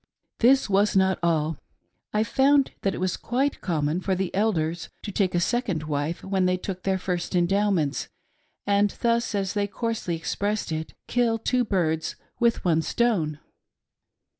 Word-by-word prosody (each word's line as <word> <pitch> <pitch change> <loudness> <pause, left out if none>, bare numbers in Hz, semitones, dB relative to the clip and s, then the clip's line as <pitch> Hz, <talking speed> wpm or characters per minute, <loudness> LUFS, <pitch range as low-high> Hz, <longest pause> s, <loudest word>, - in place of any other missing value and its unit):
This 265 +3 +5
was 200 +1 +2
not 190 0 +3
all. 160 -3 +1 0.5
I 210 +1 +2
found 275 +3 +3
that 195 - 0
it - - -5
was 185 0 0
quite 270 +4 -1
common 160 -1 0
for 190 0 0
the 185 -1 -2
Elders 175 -5 0
to 205 - -4
take 190 -2 0
a - - +3
second 190 -5 0
wife 150 +2 -2
when 190 -1 +1
they 185 0 +2
took 185 0 -5
their 190 0 0
first 180 -1 -3
Endowments, 180 -4 +1 0.6
and 205 0 +3
thus, 235 -1 +1
as 195 -1 -1
they 205 -1 0
coarsely 225 -4 -2
expressed 200 +5 -2
it, 160 0 -4
" - - -56
kill 235 -2 +2
two 245 +2 +1
birds 165 -7 0 0.2
with 235 -4 +2
one 165 -2 +3
stone." 170 -8 0
190 Hz, 165 wpm, -25 LUFS, 170-220 Hz, 0.6 s, This